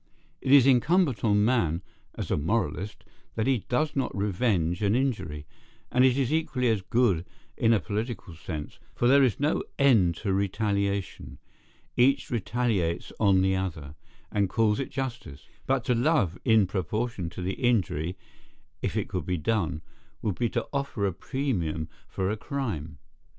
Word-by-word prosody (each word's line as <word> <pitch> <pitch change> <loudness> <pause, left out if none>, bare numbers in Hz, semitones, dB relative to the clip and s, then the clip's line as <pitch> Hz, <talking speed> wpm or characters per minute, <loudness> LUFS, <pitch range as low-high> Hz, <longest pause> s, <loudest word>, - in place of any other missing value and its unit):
It 130 - -1
is 140 -3 +8
incumbent 140 +2 +3
on 105 -2 +3
man, 95 -8 +1 0.3
as - - -5
a - - +3
moralist, 100 +4 -2 0.3
that 110 - 0
he 130 -6 0
does 150 +5 0
not 130 -6 -1
revenge 100 -3 0
an 105 +1 +2
injury; 105 - -1 0.5
and 125 +1 +4
it 130 0 +4
is 135 +1 +1
equally 130 -6 +1
as 110 -3 +1
good 105 -5 +2 0.3
in 115 - +2
a 110 - +4
political 105 -2 -4
sense, 75 -1 -7 0.2
for 120 - +2
there 140 +2 +6
is 130 -5 +2
no 145 +2 +1 0.2
end 110 -12 +4
to 100 +2 -2
retaliation; 100 0 -1 0.6
each 135 +2 +3
retaliates 110 -7 -1
on 95 -3 +4
the 95 0 +2
other, 80 -6 -4 0.4
and 100 -2 +1
calls 110 -1 +2
it 135 - -3
justice: 125 - -5 0.2
but 135 -2 +1
to 125 - +2
love 120 - +2
in 110 -4 +5
proportion 95 +1 -2
to 90 - -7
the 95 +2 -1
injury, 95 - 0 0.6
if - - -2
it - - -1
could 90 -5 -4
be 90 -1 0
done, 80 -3 -1 0.4
would 105 - 0
be 120 -2 +1
to - - -2
offer 140 -7 -1
a 95 - 0
premium 85 - -2 0.2
for 95 +1 -2
a - - -1
crime. 105 - -4
105 Hz, 160 wpm, -27 LUFS, 90-125 Hz, 0.6 s, is